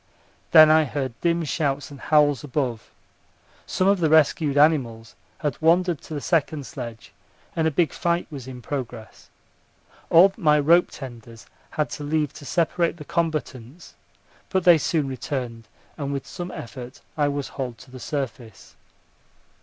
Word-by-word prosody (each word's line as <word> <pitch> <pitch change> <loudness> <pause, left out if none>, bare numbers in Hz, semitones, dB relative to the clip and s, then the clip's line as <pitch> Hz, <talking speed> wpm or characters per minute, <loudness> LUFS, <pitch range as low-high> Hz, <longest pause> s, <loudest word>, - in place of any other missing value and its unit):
Then 155 -1 +8
I 155 0 +5
heard 135 -3 -3
dim 170 0 +1
shouts 145 -2 -2
and 140 - -11
howls 150 -3 +3
above. 130 -5 -3 0.8
Some 185 - 0
of 200 -1 +3
the 160 -3 +2
rescued 155 -1 +3
animals 125 -7 +2 0.2
had 150 -4 -3
wandered 170 0 +3
to 155 - -8
the 145 - -4
second 155 -3 0
sledge, 120 -6 -8 0.4
and 160 -1 +1
a - - +3
big 160 0 +1
fight 170 0 0
was 135 -4 -8
in 125 -2 -9
progress. 125 -5 -7 0.8
All 185 +4 +7
my 150 -7 +3
rope 170 +5 +4
tenders 115 -4 -10 0.2
had 150 - -2
to 150 - -6
leave 150 -1 -1
to 145 - -11
separate 170 +4 0
the 150 - -10
combatants; 150 -3 -3 0.6
but 190 -2 0
they 170 -2 +7
soon 150 -2 0
returned, 125 -3 -5 0.3
and 140 -1 -3
with 140 -1 -4
some 175 -1 -7
effort 125 -1 -9
I 145 -2 +2
was 145 -1 -3
hauled 125 -4 -5
to 130 - -16
the 130 - -10
surface. 125 -5 -6
145 Hz, 155 wpm, -24 LUFS, 130-160 Hz, 0.8 s, Then